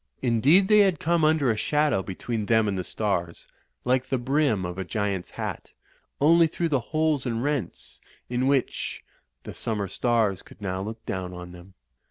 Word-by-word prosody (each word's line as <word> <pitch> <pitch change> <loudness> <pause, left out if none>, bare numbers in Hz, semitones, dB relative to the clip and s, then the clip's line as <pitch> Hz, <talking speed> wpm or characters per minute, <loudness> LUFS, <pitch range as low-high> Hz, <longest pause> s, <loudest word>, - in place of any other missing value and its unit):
Indeed 135 - +4
they 210 0 +6
had 190 -6 +4
come 170 0 +1
under 155 -5 +3
a - - 0
shadow 145 0 +1
between 105 +3 -4
them 110 -2 +3
and 100 - -1
the 90 - -2
stars, 90 -5 -3 0.4
like 125 +1 +1
the 130 - +1
brim 130 -6 +1
of 90 +1 -5
a - - -1
giant's 100 -2 -2
hat; - - -6 0.5
only 165 +3 +5
through 170 +1 -2
the 140 -4 +2
holes 155 -4 +1
and 115 0 -2
rents 140 - -3 0.3
in 125 +2 0
which 135 -2 -1 0.4
the - - -8
summer 105 -3 -3
stars 110 -2 +1
could - - -17
now 95 -2 -3
look 110 +3 -7
down 90 -1 -4
on 90 0 -9
them. 90 +2 -14
120 Hz, 180 wpm, -26 LUFS, 95-150 Hz, 0.5 s, they